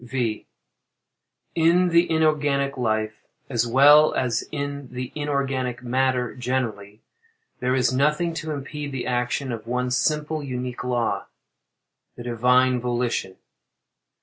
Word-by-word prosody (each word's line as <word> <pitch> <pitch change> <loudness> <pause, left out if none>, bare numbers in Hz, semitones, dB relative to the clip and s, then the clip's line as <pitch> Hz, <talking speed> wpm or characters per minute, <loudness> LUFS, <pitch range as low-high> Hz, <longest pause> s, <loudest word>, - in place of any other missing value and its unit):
V. 120 -3 -3 1.1
In 170 +2 +3
the 170 +1 +3
inorganic 145 -3 +1
life, 110 -3 -1 0.3
as 120 -1 +1
well 145 +5 +6
as 120 -3 0
in 140 -2 -4
the 125 0 -5
inorganic 135 -4 -2
matter 125 -1 0
generally, 115 -5 -3 0.6
there 125 +1 +1
is 130 0 +2
nothing 150 +5 +1
to 160 -1 -5
impede 145 0 -5
the 130 - -3
action 125 +2 -1
of 115 -1 -6
one 125 +1 -1
simple 150 +4 0
unique 125 -2 -5
law—the 120 0 -6
Divine 125 +2 +3
Volition. 120 -6 -2
130 Hz, 115 wpm, -24 LUFS, 120-145 Hz, 1.1 s, well